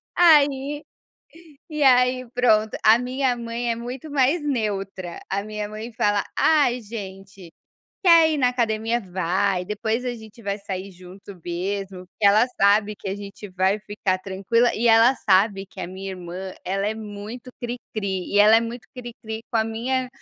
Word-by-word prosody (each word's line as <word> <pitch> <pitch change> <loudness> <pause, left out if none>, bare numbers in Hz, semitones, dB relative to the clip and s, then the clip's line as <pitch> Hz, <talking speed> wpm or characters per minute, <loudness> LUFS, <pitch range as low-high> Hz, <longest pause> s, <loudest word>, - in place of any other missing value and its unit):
Aí 290 -4 +4 0.9
e 300 -1 -1
aí, 255 -1 +4
pronto, 220 -3 +2
a 220 +1 +7
minha 255 0 0
mãe 235 +1 -4
é - - -1
muito 245 +6 -7
mais 285 +4 +2
neutra, 195 -9 -3
a 200 +1 -1
minha 210 0 -5
mãe 215 +3 -7
fala: 205 -2 +1
"Ai 285 -6 +3
gente, 195 -4 -9 0.5
quer 335 -3 +7
ir 305 - -1
na 255 -2 +3
academia, 230 -1 0
vai, 185 0 -1
depois 220 +4 -2
a 250 - -2
gente 220 0 -13
vai 200 -1 -3
sair 195 -1 -6
junto 185 +2 -13
mesmo". 185 +2 -4
Porque 205 +3 -1
ela 210 +4 +5
sabe 205 +1 +4
que 195 - -8
a 190 - -2
gente 205 0 -9
vai 190 +2 +1
ficar 205 -3 -2
tranquila, 195 +6 +1
e 235 - 0
ela 230 +3 +6
sabe 195 -2 +2
que - - -11
a - - -4
minha 190 +1 -7
irmã 185 +1 -7
ela 195 +2 -2
é 215 - -1
muito 220 +3 -8
cricri 215 -6 -4
e 205 - +4
ela 215 +2 +7
é - - +4
muito 230 +1 -6
cricri 230 -3 -7
com 230 - 0
a 220 - +2
minha 250 +4 -2
215 Hz, 170 wpm, -23 LUFS, 195-245 Hz, 0.9 s, a